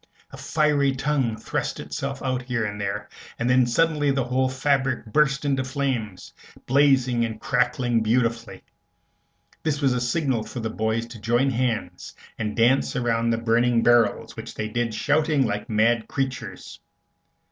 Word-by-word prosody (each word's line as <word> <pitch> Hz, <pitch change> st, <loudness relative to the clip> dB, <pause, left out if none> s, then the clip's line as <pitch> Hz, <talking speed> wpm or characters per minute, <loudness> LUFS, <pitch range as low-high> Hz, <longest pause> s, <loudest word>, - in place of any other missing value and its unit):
A -, -, -10 dB
fiery 145 Hz, -3 st, +1 dB
tongue 135 Hz, -5 st, 0 dB
thrust 110 Hz, -, -3 dB
itself 140 Hz, 0 st, -5 dB
out 130 Hz, -1 st, -1 dB
here 125 Hz, -3 st, -2 dB
and 105 Hz, 0 st, -5 dB
there, 100 Hz, +1 st, -3 dB, 0.3 s
then 125 Hz, +1 st, +3 dB
suddenly 150 Hz, +2 st, +2 dB
the 135 Hz, -1 st, +1 dB
whole 130 Hz, +1 st, 0 dB
fabric 130 Hz, -2 st, 0 dB
burst 135 Hz, +4 st, +1 dB
into 135 Hz, -2 st, +1 dB
flames, 130 Hz, -8 st, -3 dB, 0.3 s
blazing 130 Hz, -3 st, +3 dB
and 110 Hz, -1 st, -4 dB
crackling 125 Hz, -2 st, +1 dB
beautifully. 115 Hz, 0 st, -1 dB, 1.0 s
This 150 Hz, -2 st, -1 dB
was 135 Hz, -3 st, +2 dB
a 125 Hz, -, -1 dB
signal 130 Hz, -2 st, 0 dB
for 120 Hz, -, -7 dB
the 110 Hz, -1 st, -3 dB
boys 110 Hz, +1 st, -1 dB
to 115 Hz, -2 st, -12 dB
join 120 Hz, +5 st, +2 dB
hands 120 Hz, -2 st, -3 dB, 0.2 s
and 105 Hz, -1 st, -3 dB
dance 120 Hz, +4 st, +3 dB
around 115 Hz, -2 st, 0 dB
the 115 Hz, -, +1 dB
burning 115 Hz, +1 st, +2 dB
barrels, 120 Hz, -2 st, +2 dB
which -, -, -8 dB
they 110 Hz, -, -3 dB
did 115 Hz, 0 st, -2 dB
shouting 145 Hz, +2 st, +2 dB
like 105 Hz, -1 st, -3 dB
mad 115 Hz, +1 st, +2 dB
creatures. 135 Hz, -4 st, -5 dB
125 Hz, 150 wpm, -24 LUFS, 115-135 Hz, 1.0 s, then